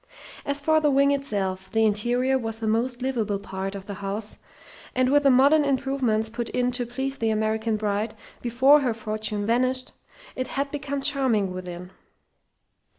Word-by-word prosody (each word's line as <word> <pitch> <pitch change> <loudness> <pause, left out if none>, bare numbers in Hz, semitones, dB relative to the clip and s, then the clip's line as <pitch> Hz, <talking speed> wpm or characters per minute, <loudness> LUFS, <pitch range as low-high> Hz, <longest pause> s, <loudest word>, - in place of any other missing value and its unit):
As 285 0 0
for 315 +2 +3
the 300 - +3
wing 280 0 +4
itself, 195 -9 -2
the 225 0 +2
interior 240 +5 +1
was 225 -3 -2
the 225 - -3
most 240 +3 0
"liveable" 225 -6 -1
part 195 0 -5
of 195 -1 -7
the 200 - -6
house, 200 +2 -3 0.6
and 255 0 +3
with 290 +1 +4
the 280 - +4
modern 280 +4 +5
improvements 265 -5 0
put 235 +1 -4
in 250 0 0
to 245 -1 -1
please 265 +3 -3
the 225 - +1
American 220 0 0
bride 210 +1 -2 0.3
before 260 +5 +5
her 250 -5 0
fortune 215 -1 -3
vanished, 255 +3 0 0.4
it 255 -1 -2
had 275 +1 -2
become 280 -1 -3
charming 235 -10 +1
within. 180 0 -7
235 Hz, 165 wpm, -25 LUFS, 215-270 Hz, 0.6 s, modern